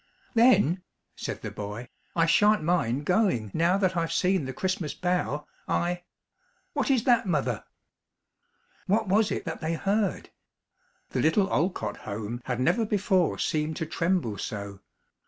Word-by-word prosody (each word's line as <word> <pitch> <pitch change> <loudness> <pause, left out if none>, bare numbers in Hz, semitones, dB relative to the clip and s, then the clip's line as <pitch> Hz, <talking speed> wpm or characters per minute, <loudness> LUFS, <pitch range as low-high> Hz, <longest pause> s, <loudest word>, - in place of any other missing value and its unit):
"Then," 225 - +4 0.3
said - - -5
the - - -4
boy, 105 +4 -6 0.3
"I 165 -1 +4
sha'n't 210 +3 +4
mind 145 -5 +1
going, 180 - +1
now 170 +3 +3
that 190 -2 +1
I've 165 -1 0
seen 185 -4 +2
the 130 - -4
Christmas 185 +1 -2
bough. 180 -5 -1 0.2
I 175 +1 0 0.7
What - - 0
is 260 -5 +3
that, 240 -5 +3
mother?" 135 - -1 1.2
What 215 +2 +2
was 210 +3 +3
it - - -3
that 165 - -5
they 160 +1 -1
heard? 200 +3 -1 0.8
The - - 0
little 190 +5 +2
Olcott 150 - 0
home 110 +4 -5
had 125 -1 -2
never 175 - +2
before 200 -4 +1
seemed 155 0 -1
to 160 - -3
tremble 165 - -1
so. 100 -2 -5
170 Hz, 145 wpm, -27 LUFS, 135-195 Hz, 1.2 s, Then